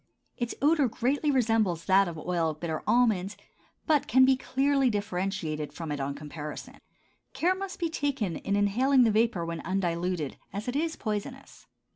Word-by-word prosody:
Its 240 -2 -3
odor 295 -2 +4
greatly 270 +6 0
resembles 225 - +1
that 195 0 +4
of 170 -2 -6
oil 165 0 -1
of 155 -1 -6
bitter 160 -2 -3
almonds, 210 -5 +2 0.5
but 300 -3 +2
can 260 +1 +6
be 265 0 +5
clearly 270 +1 +1
differentiated 185 -7 -2
from 165 -3 -6
it 145 - -3
on 140 +1 -3
comparison. 150 +1 -8 0.5
Care 355 +3 +2
must 380 0 -6
be 340 - -1
taken 275 - -2
in 200 - -2
inhaling 250 +7 +3
the 225 - +4
vapor 215 -5 +1
when 165 -1 -4
undiluted, 175 -4 -2
as 205 +2 -5
it 245 - -2
is 320 +2 0
poisonous. 225 +6 -6
205 Hz, 165 wpm, -28 LUFS, 170-265 Hz, 0.5 s, can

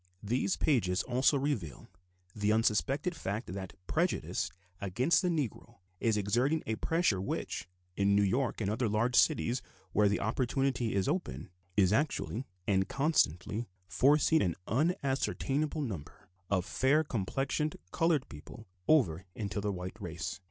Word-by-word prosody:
These 125 - 0
pages 105 -10 +2
also 130 +3 +3
reveal 135 - -3 0.5
the 105 0 +1
unsuspected 125 - +1
fact 105 - -4
that 95 -1 -6
prejudice 155 - 0 0.3
against 120 - +2
the 185 - 0
Negro 150 - -2 0.2
is 110 -2 +2
exerting 120 +10 +1
a 110 0 -2
pressure 165 - +1
which, 80 -5 -3 0.3
in 100 +1 +3
New 100 - +4
York 120 +5 0
and 100 -1 0
other 115 +1 0
large 115 +4 +1
cities 125 -5 +3 0.3
where 105 -1 +4
the 100 - 0
opportunity 125 0 0
is 95 - +1
open, 140 - -3 0.3
is 95 -1 +4
actually 135 -2 -1 0.2
and 95 -1 +1
constantly 120 - +1 0.2
forcing 150 - +4
an 85 -3 +1
unascertainable 145 - 0
number 85 - -7 0.2
of 95 -3 +1
fair 135 +8 +2
complexioned 135 +5 -1
colored 165 -1 +2
people 75 -1 -11 0.2
over 95 - +3
into 105 -1 -3
the 105 0 -1
white 90 +3 -6
race. 85 -1 -5
115 Hz, 140 wpm, -32 LUFS, 100-140 Hz, 0.5 s, New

